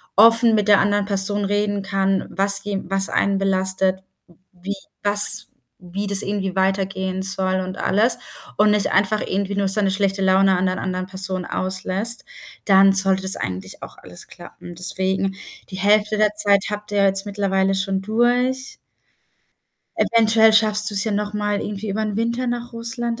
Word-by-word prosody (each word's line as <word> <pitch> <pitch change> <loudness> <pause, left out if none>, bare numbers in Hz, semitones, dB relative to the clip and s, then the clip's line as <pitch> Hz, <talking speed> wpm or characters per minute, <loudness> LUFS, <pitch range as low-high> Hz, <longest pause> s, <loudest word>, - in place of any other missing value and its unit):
offen 230 +2 +6
mit 210 -1 0
der 205 -1 +5
anderen 205 0 +1
Person 200 0 +1
reden 205 0 -1
kann, 195 -1 -1
was 195 0 +2
je 200 -1 -3
was 195 +1 -1
einen 200 0 0
belastet, 190 -1 0 0.5
wie 190 +3 -6 0.3
was 205 +1 +3 0.3
wie 185 +3 -6
das 200 -1 +2
irgendwie 195 -2 -3
weitergehen 190 0 -1
soll 190 0 -1
und 185 0 -6
alles 225 +5 +1 0.4
und 210 0 +4
nicht 210 -1 +1
einfach 205 +2 +1
irgendwie 200 +1 -3
nur 200 -1 0
seine 195 0 +1
schlechte 195 0 -1
Laune 190 0 +3
an 180 - 0
der 185 +1 -2
anderen 185 -1 -4
Person 190 -1 -4
auslässt, 190 +6 -2 0.4
dann 195 -1 +5
sollte 195 0 +3
das 190 0 +1
eigentlich 95 0 -6
auch - - -11
alles 90 -1 -11
klappen. 175 0 -13
Deswegen, 190 +2 -2 0.3
die 190 - -8
Hälfte 210 +2 +2
der 210 -1 +2
Zeit 200 -1 +2
habt 210 0 -6
ihr 205 - 0
ja - - +3
jetzt 195 +1 +1
mittlerweile 195 -1 0
schon 195 0 -2
durch. 245 +5 0 1.2
Eventuell 225 -1 +4
schaffst 215 -1 +3
du's 200 -1 0
ja 220 - -2
noch 205 0 -3
mal 210 -1 -2
irgendwie 210 +1 -6
übern 210 0 -3
Winter 235 +2 -2
nach 240 0 -4
Russland, 235 +1 -4
200 Hz, 165 wpm, -20 LUFS, 190-210 Hz, 1.2 s, offen